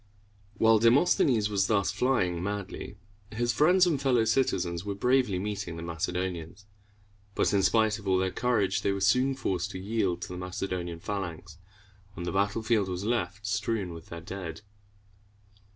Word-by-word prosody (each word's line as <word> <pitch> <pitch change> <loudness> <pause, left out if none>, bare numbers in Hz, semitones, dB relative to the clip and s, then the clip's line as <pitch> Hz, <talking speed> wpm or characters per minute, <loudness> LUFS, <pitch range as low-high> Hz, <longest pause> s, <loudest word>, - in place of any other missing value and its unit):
While 110 -1 +5
Demosthenes 115 -2 +4
was 100 -1 +2
thus 100 -3 +2
flying 90 -10 0
madly, 100 0 -5 0.3
his 120 +2 0
friends 180 - +5
and 155 -6 0
fellow 125 -5 +3
citizens 90 -8 0
were 100 -1 -4
bravely 125 -2 +2
meeting 95 -3 -4
the 80 - -6
Macedonians; 85 +2 -4 0.7
but, - - +1
in 100 - +3
spite 110 +1 +2
of 100 - -10
all 95 -1 +3
their 95 0 0
courage, 110 -5 +1
they 100 - +1
were 100 - -3
soon 125 +7 +3
forced 90 -9 -2
to 95 - -6
yield 100 -3 -1
to - - -6
the 90 0 -6
Macedonian 90 -2 -4
phalanx, 90 -5 -5 0.6
and 85 - -5
the 85 - -2
battlefield 100 +1 +1
was 90 +1 -3
left 110 -2 -2
strewn 105 -3 -1
with 85 0 -11
their 85 0 -8
dead. 90 +2 -7
100 Hz, 160 wpm, -28 LUFS, 90-115 Hz, 0.7 s, While